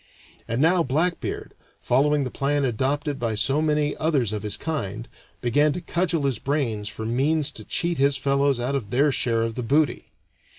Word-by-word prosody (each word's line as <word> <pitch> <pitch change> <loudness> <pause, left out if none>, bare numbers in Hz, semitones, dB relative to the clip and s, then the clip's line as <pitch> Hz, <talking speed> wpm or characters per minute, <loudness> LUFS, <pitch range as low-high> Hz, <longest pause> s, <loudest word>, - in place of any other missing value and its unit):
And 115 +5 0
now 175 +2 +4
Blackbeard, 165 +5 -1 0.3
following 145 +3 +2
the 130 - -4
plan 140 0 0
adopted 135 +4 -1
by 115 -2 -1
so 135 +7 +2
many 150 -1 +1
others 140 -9 +1
of 105 - -3
his 105 -1 -3
kind, 115 -8 -4 0.3
began 145 +5 +2
to - - -4
cudgel 170 -2 -1
his 135 -6 0
brains 120 -8 -1
for 110 +1 -6
means 140 +6 +1
to 110 - -7
cheat 170 +7 -2
his 140 0 +3
fellows 140 -1 +1
out 125 +3 -1
of 130 -8 -2
their 140 +5 +3
share 115 -3 0
of 115 0 -2
the 125 - -4
booty. 145 +5 0
140 Hz, 180 wpm, -24 LUFS, 120-150 Hz, 0.3 s, now